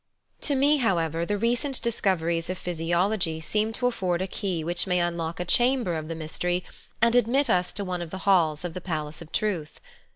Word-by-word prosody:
To 290 - +1
me, 285 +3 +4
however, 170 - 0
the 205 - 0
recent 240 +5 0
discoveries 170 -8 0
of 185 - -2
physio 175 +1 0
logy 185 -7 -1
seem 210 +7 0
to 245 +2 -1
afford 185 -7 0
a - - -3
key 185 -4 -3
which 175 +3 +1
may 180 -1 +2
unlock 170 -1 -2
a 180 - -2
chamber 240 -1 +3
of 155 -1 -4
the 165 - -4
mystery 175 +3 -2 0.4
and 235 0 +5
admit 245 +2 +3
us 180 -2 +2
to 200 - -2
one 180 -1 -3
of 170 - -5
the 190 - -6
halls 170 -5 +3
of 175 - -4
the 185 - -6
palace 155 -3 -4
of 160 - -11
truth. 180 -8 -2
180 Hz, 205 wpm, -26 LUFS, 165-220 Hz, 0.4 s, and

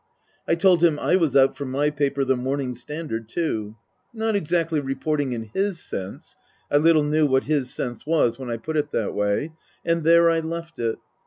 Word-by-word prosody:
I 165 - +3
told 175 -1 +4
him 165 -3 +4
I 175 - +2
was 160 -7 +2
out 135 0 +4
for 145 - -5
my 140 +3 0
paper, 140 -2 0
the 130 0 +2
Morning 130 +1 -2
Standard, 120 -2 -6
too. 110 -10 -2 0.4
Not 225 -1 -1
exactly 165 -3 0
reporting, 140 0 -2
in 110 -2 -6
his 195 -3 0
sense 95 -8 -6 0.4
(I 145 - +5
little 155 0 +4
knew 150 +1 +2
what 130 -1 +2
his 140 -4 0
sense 120 -3 -4
was 145 -6 +1
when 130 -2 -6
I 115 - -2
put 155 +7 -4
it 150 0 0
that 110 - -2
way); 105 +10 -1 0.3
and 165 -1 +1
there 170 +1 +6
I 165 - +1
left 165 0 -6
it. 115 -1 -1
150 Hz, 195 wpm, -23 LUFS, 130-165 Hz, 0.4 s, there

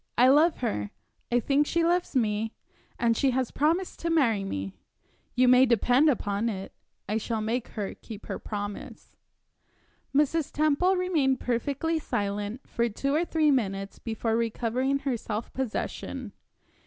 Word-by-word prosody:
"I 250 +2 +6
love 310 +5 +5
her 105 - -1 0.4
I 245 - +4
think 285 +4 +2
she 335 0 +1
loves 350 -2 +1
me 220 -2 0 0.4
and 230 -1 +2
she 270 - +2
has 255 -2 0
promised 335 +6 0
to 335 - -2
marry 240 -11 +2
me. 95 - -4 0.6
You 255 0 +4
may 250 +1 +7
depend 245 +5 +4
upon 215 -3 0
it, 195 -3 -6 0.3
I 210 +2 0
shall 225 0 -2
make 230 +3 -1
her 205 -2 -2
keep 215 -2 -11
her - - -4
promise." 205 -1 -6 1.0
Mrs. 295 +2 +1
Temple 310 +5 +2
remained 315 -8 +1
perfectly 280 +7 -1
silent 205 -1 -3
for 235 0 0
two 275 +6 -2
or 325 +4 +2
three 310 -3 +2
minutes 195 -6 -1
before 225 0 -2
recovering 235 +4 0
her 270 -3 -2
self 220 0 -5
possession. 260 -1 -4
245 Hz, 150 wpm, -27 LUFS, 215-290 Hz, 1.0 s, may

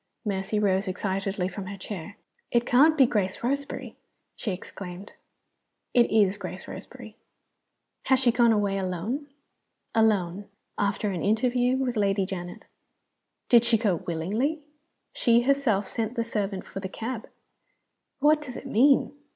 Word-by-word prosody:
Mercy 195 +1 -1
rose 195 -1 +1
excitedly 190 0 -2
from 190 +1 -6
her 200 0 -6
chair. 195 -1 -7 0.3
"It 235 0 +2
can't 300 +7 +5
be 270 - +7
Grace 205 -4 -1
Roseberry?" 280 +3 -3 0.4
she 215 - -3
exclaimed. 185 +1 -8 0.8
"It 240 -1 +4
is 205 -2 +3
Grace 190 -1 -7
Roseberry." - - -10 0.9
"Has 265 -1 +4
she 255 -2 +4
gone 235 0 +4
away 200 -2 +1
alone?" 195 - -3 0.7
"Alone 205 -4 +1 0.3
after 200 +1 0
an 180 -3 -3
interview 245 +4 +2
with 250 -3 -1
Lady 195 -1 +2
Janet." 180 -2 -7 0.8
"Did 235 -2 +6
she 235 -1 +4
go 205 -6 +1
willingly?" 215 - -2 0.5
"She 235 -1 +4
herself 245 -7 +2
sent 230 +1 -3
the 230 - 0
servant 205 -4 -3
for - - -7
the 190 -1 -5
cab." 225 +3 -5 0.9
"What 300 +2 +4
does 255 -4 -7
it - - -9
mean?" 270 +3 +4
210 Hz, 140 wpm, -26 LUFS, 195-245 Hz, 0.9 s, be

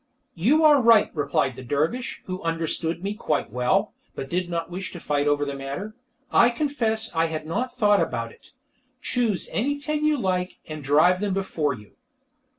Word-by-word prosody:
"You 260 - +3
are 295 -3 +7
right," 230 -3 +5
replied 140 -3 0
the - - -9
dervish, 150 - -2
who 185 0 -5
understood 165 +1 -2
me 200 +1 -1
quite 150 - -2
well, 125 +1 +1 0.2
but 135 - -6
did 180 0 -1
not 170 0 -3
wish 180 0 -5
to 175 - -7
fight 145 -2 0
the 145 -1 +1
matter. 140 +11 -6 0.4
"I 240 - +6
confess 235 - -1
I 165 0 +3
had 160 -1 -4
not 240 +11 -2
thought 205 -4 +4
about 115 -1 -2
it. - - -19 0.5
Choose 235 -8 -1
any 285 +6 -1
ten 300 +1 -2
you 305 -1 +3
like, 185 -5 -1
and 155 -1 -7
drive 155 +7 +4
them 200 -2 0
before 155 -7 -1
you." 105 -3 -16
180 Hz, 175 wpm, -24 LUFS, 145-225 Hz, 0.5 s, are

